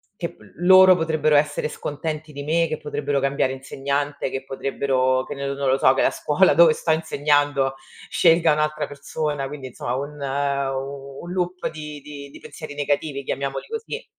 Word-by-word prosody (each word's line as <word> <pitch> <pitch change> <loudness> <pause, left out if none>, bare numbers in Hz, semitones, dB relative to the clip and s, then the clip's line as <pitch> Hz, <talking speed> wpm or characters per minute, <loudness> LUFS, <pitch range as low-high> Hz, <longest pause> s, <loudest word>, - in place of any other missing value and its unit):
che 170 -4 -5
p - - -29 0.2
loro 185 +2 +7
potrebbero 155 -3 +1
essere 145 +1 +2
scontenti 155 +1 -5
di 140 0 -6
me, 165 +2 +2
che 155 - -3
potrebbero 145 -1 -2
cambiare 135 -1 +1
insegnante, 140 +2 -3
che 135 0 -4
potrebbero 130 -1 0
che - - -6
nel 140 0 -3
non 140 -1 0
lo 130 - +3
so, 135 - +5
che - - +2
la - - +3
scuola 165 +3 +3
dove 165 +1 +7
sto 160 - -1
insegnando 145 -3 +1 0.3
scelga 165 -2 +4
un'altra 150 0 0
persona, 145 0 -3
quindi 135 -2 -7
insomma 120 0 -4
un 145 +2 -6
u 140 0 -3
un 175 - -7
loop 180 0 -2
di 150 -2 -8
di 140 -1 -9
di - - -13
pensieri 155 -3 -9
negativi, 145 0 -1
chiamiamoli 135 +1 -3
così. 455 +1 -6
145 Hz, 175 wpm, -23 LUFS, 140-155 Hz, 0.3 s, loro